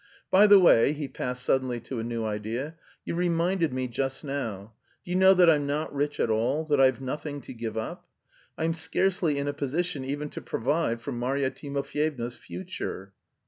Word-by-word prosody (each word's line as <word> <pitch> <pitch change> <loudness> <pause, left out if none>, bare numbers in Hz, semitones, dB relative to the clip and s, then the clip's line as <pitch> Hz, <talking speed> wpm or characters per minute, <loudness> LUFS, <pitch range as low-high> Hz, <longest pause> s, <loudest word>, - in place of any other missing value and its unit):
"By 200 +3 +7
the 205 -1 +9
way," 145 -6 +6
he 150 -1 -4
passed 125 -1 -4
suddenly 130 -2 +1
to 120 +1 -5
a - - -3
new 115 -1 -3
idea, 110 +8 -3 0.3
"you - - -3
reminded 170 -1 +1
me 130 0 -2
just 135 +3 -3
now. 115 -8 -4 0.3
Do 175 - -7
you - - 0
know 190 +1 +6
that 180 -1 +6
I'm 150 -3 +4
not 150 +2 -2
rich 145 +1 -1
at 115 - +2
all, 125 +8 +1
that 145 -2 +4
I've 130 -1 +4
nothing 145 +2 -4
to - - -9
give 115 -2 -5
up? 110 - -5 0.5
I'm 165 +1 0
scarcely 170 -1 +1
in 140 0 -2
a 145 - -1
position 145 +2 -2
even 145 +3 -3
to - - -6
provide 125 -2 -1
for - - -4
Marya 130 +3 -1
Timofyevna's 140 -3 -3
future.... 135 - -7
140 Hz, 185 wpm, -27 LUFS, 120-160 Hz, 0.5 s, the